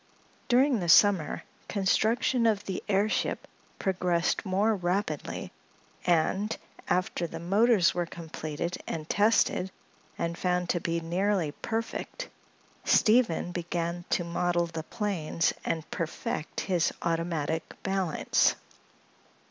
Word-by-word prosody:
During 255 0 +4
the 175 -2 -2
summer 195 -4 +5 0.2
construction 220 +4 +2
of 210 -3 +1
the 190 - -3
airship 205 +2 +1 0.3
progressed 180 -3 0
more 200 +4 +2
rapidly 180 -4 -2 0.6
and, 185 +5 +2 0.3
after 175 -1 0
the - - -7
motors 195 0 +4
were 175 -1 -1
completed 165 0 -5
and 155 -2 -4
tested 205 -2 +2 0.5
and 170 0 -2
found 180 0 0
to 175 - +1
be 170 0 -1
nearly 175 -1 0
perfect, 230 - -4 0.5
Steve 235 +2 +5 0.2
began 170 0 -3
to 175 - +1
model 175 0 0
the 165 -1 -5
planes 170 -4 -1
and 160 -2 -2
perfect 165 -2 -3
his 180 -5 +1
automatic 165 -2 -1
balance. 190 -4 +2
180 Hz, 110 wpm, -28 LUFS, 170-205 Hz, 0.6 s, summer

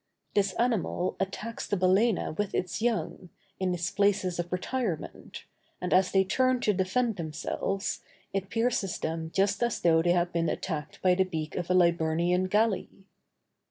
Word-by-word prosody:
This 200 -2 +2
animal 220 -6 0
attacks 210 +4 -4
the 205 - 0
balæna 185 0 +2
with 205 +1 -2
its 180 +3 -2
young, 225 -6 -1 0.3
in 185 -1 0
its 175 -1 -2
places 200 -3 +1
of 175 0 -3
retirement, 185 -1 -4 0.3
and 180 - -1
as 185 0 +4
they 190 -1 +4
turn 255 +6 +2
to 210 - +2
defend 200 +5 0
themselves, 170 +4 -3 0.3
it 195 0 -2
pierces 230 -4 0
them 160 0 -3
just 195 +4 +1
as 240 -2 0
though 165 -1 +4
they 175 +1 +3
had 175 0 0
been 170 -1 +1
attacked 155 -5 -4
by 185 -1 +5
the 190 +1 +3
beak 160 -4 -4
of 175 -1 -3
a 180 - +3
Liburnian 170 +1 +2
galley. 210 0 +1
185 Hz, 160 wpm, -28 LUFS, 175-205 Hz, 0.3 s, by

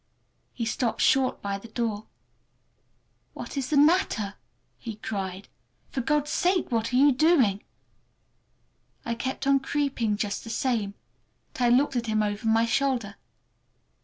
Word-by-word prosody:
He 235 - -4
stopped 225 +1 -1
short 265 -1 +2
by 200 -1 -2
the 230 - -12
door. 220 -2 -3 1.3
"What - - -7
is 270 -2 -2
the 300 - +2
matter?" 285 - +3 0.5
he 225 -3 -6
cried. 195 -3 -5 0.4
"For 260 - -2
God's 295 +3 0
sake, 360 -4 +1
what 230 0 0
are - - -1
you 280 +3 +6
doing!" 260 - +3 1.4
I 235 - -1
kept 260 +4 -4
on 275 0 +4
creeping 265 -6 -1
just 205 -1 -3
the 225 - -9
same, 225 -5 -1 0.6
but - - -7
I 240 - +4
looked 265 +3 +3
at 235 -1 -1
him 215 -1 +1
over 205 +1 -2
my 225 +1 +4
shoulder. 235 -4 0
235 Hz, 145 wpm, -26 LUFS, 215-275 Hz, 1.4 s, you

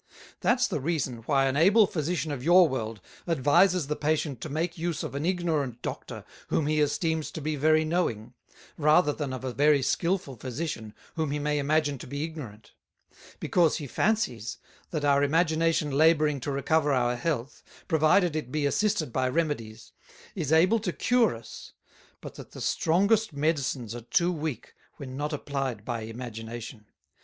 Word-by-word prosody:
That's 245 +1 +2
the - - -2
reason, 140 -4 -2
why 135 -2 +3
an 135 0 0
able 200 +8 +6
Physician 155 -3 -2
of 135 -3 -5
your 175 +3 +6
World 115 -6 -4 0.3
advises 165 +3 +3
the 150 +2 -2
Patient 150 -4 -1
to 155 - -5
make 165 +4 -2
use 165 -2 -3
of - - -5
an 145 +4 -2
Ignorant 155 -9 -1
Doctor - - -6 0.2
whom 155 - 0
he 155 0 +1
esteems 160 +2 0
to - - -7
be 155 +1 -2
very 155 +2 +3
knowing, 125 -9 -1 0.5
rather 150 +1 +4
than 145 -3 -4
of 130 0 -6
a 130 -2 -3
very 145 0 +3
Skilful 170 -5 -1
Physician 125 -3 -5 0.2
whom 160 -3 -1
he 145 - -1
may 150 0 0
imagine 145 -1 +1
to - - -9
be 140 +3 -4
Ignorant; 135 -10 -8 0.7
because 170 -4 +2
he 150 - -6
fancies, 130 - -1 0.3
that 150 -3 -2
our 140 -1 +4
Imagination 160 0 +2
labouring 150 0 +3
to 140 - -4
recover 145 +2 +1
our 125 -2 +1
Health, 140 0 -3 0.3
provided 160 +2 +3
it 150 -5 -4
be 150 0 0
assisted 170 - 0
by 130 -1 +1
Remedies, 120 -8 -3 0.4
is 160 -7 -3
able 180 +8 +4
to 215 - -2
cure 240 - +2
us; 115 0 -11 0.5
but - - -8
that - - -11
the - - -8
strongest 200 +4 +2
Medicines 140 -6 -1
are 120 - -6
too 170 +9 +1
weak, 155 -5 -5 0.2
when 130 -3 -8
not 150 +3 -3
applied 135 -7 -3
by 120 -2 -3
Imagination. 115 -1 -8
150 Hz, 165 wpm, -27 LUFS, 130-165 Hz, 0.7 s, able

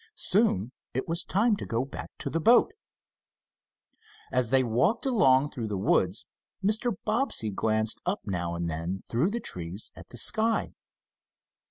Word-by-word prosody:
Soon 155 - +1 0.2
it 130 - -1
was 170 +1 -1
time 210 +3 +2
to - - -6
go 115 +3 0
back 140 - -8
to - - -4
the 165 - 0
boat. 235 +9 +5 1.6
As 125 -3 +1
they 130 +1 +4
walked 130 - +1
along 145 - +4
through 115 -3 -4
the 105 -2 -2
woods, 95 0 +1 0.4
Mr. 220 +2 +1
Bobbsey 215 - +1
glanced 110 +2 0
up 185 +3 -1
now 85 -4 -2
and 85 0 -2
then 85 +4 -3
through 130 +11 +1
the 235 +3 -2
trees 90 - -7
at - - -12
the 120 - -10
sky. 220 - 0
130 Hz, 155 wpm, -28 LUFS, -, 1.6 s, boat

